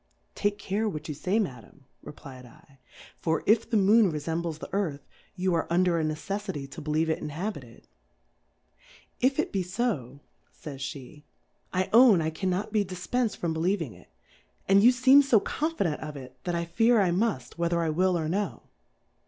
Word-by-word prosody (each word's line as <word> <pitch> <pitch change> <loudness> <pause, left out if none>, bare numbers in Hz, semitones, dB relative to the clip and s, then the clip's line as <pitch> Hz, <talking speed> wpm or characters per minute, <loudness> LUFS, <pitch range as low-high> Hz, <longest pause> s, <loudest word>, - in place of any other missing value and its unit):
Take 205 0 -1
care 210 +2 -1
what 155 -4 -6
you 155 - -3
fay, 180 +8 -1
Madam, 135 - -5 0.2
reflfd 135 0 -13 0.2
/, - - -18
for 160 -1 0
if 225 +2 +3
the 225 - +2
Moon 205 0 +5
refembles 160 +1 -3
the - - -10
Earth, 160 -9 -2 0.3
you 185 -1 0
are 165 - 0
under 175 0 +2
a - - 0
neceffity 160 0 -4
to - - -8
believe 155 +2 0
it 160 - 0
inhabited. 150 - -6 1.3
If 265 +2 +2
it - - 0
be 195 - 0
fo, 180 - -3 0.3
fays 140 -3 -10
pe^ 140 +2 -7 0.5
I 185 0 0
own 230 -5 +7
I 160 0 -1
cannot 185 +5 -2
be 210 -2 +3
dif 180 -2 -9
pensM 245 -4 +1
from 170 -2 -2
believing 165 - -1
it; 90 -1 -18 0.6
and 195 +1 +5
you 240 +4 +7
feem 260 +3 +6
fo 250 -6 +4
confident 290 - -2
of 150 -2 -6
it, 130 -1 -10
that 175 - -1
I 170 0 -1
fear 225 +7 +3
I 190 -3 +3
muft, 175 - -1
w^hether 170 0 0
I 165 -2 0
will 180 +2 +2
or 160 -2 -2
no. 200 +5 -2
175 Hz, 175 wpm, -27 LUFS, 155-205 Hz, 1.3 s, own